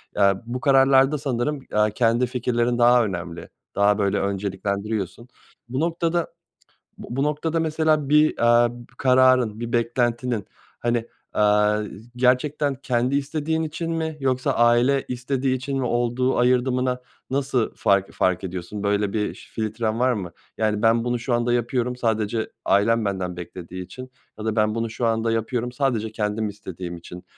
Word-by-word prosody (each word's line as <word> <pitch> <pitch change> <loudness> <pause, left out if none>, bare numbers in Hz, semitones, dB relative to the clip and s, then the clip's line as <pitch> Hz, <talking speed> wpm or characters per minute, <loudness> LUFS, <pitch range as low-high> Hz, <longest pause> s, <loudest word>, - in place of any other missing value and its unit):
Aaa, 100 -1 +4
bu 120 +2 -4
kararlarda 135 +1 +4
sanırım, 135 0 -2
aaa, 105 0 +3
kendi 115 +3 +2
fikirlerin 120 -1 0
daha 120 0 +5
önemli, 85 -4 -6 0.3
daha, 100 0 +3
böyle, 100 -2 +1
önceliklendiriyorsun. 100 +2 -3 0.4
Bu 130 +2 -2
noktada 170 +1 -1 0.6
Bu 120 - -7
bu 135 - +1
noktada 155 +2 -1
mesela 155 -2 +1
bir, 150 +1 +4
aaa, 120 0 +5
b 120 0 -11
kararın, 130 -4 +4
bir 120 0 -4
beklentinin, 120 -2 0 0.3
hani, 120 -1 0 0.3
aaa, 105 0 +3
z 110 +3 -11
gerçekten 135 +3 +2
kendi 125 +1 0
istediğin 155 +3 -1
için 165 +1 -4
mi 160 -1 -2
yoksa 130 -1 0
aile 120 +3 +3
istediği 130 +1 -1
için 135 +2 -3
mi 130 - -1
olduğu 120 +2 0
ayırdına 125 +1 +2 0.3
nasıl 135 -3 0
fark 100 -1 +1
fark 95 +1 0
ediyorsun? 95 +3 -5
Böyle 100 0 0
bir 105 -2 -1
ş - - -15
filtren 110 +1 -2
var 130 0 +3
mı? 95 -6 -4 0.3
Yani, 110 -1 0
"Ben 115 0 +3
bunu 120 0 0
şu 120 +1 -1
anda 120 0 +1
yapıyorum, 120 +1 0
sadece 110 -1 -1
ailem 115 +3 +3
benden 95 -3 -2
beklediği 90 +1 -7
için." 130 +6 -10 0.3
ya 105 - -6
da 110 0 -1
"Ben 110 0 +2
bunu 115 0 -2
şu 115 +2 -2
anda 115 0 +1
yapıyorum 120 +2 -2
sadece 120 -5 -1
kendim 105 0 -1
istediğim 95 -3 -7
için." 90 +2 -11
120 Hz, 155 wpm, -23 LUFS, 105-130 Hz, 0.6 s, daha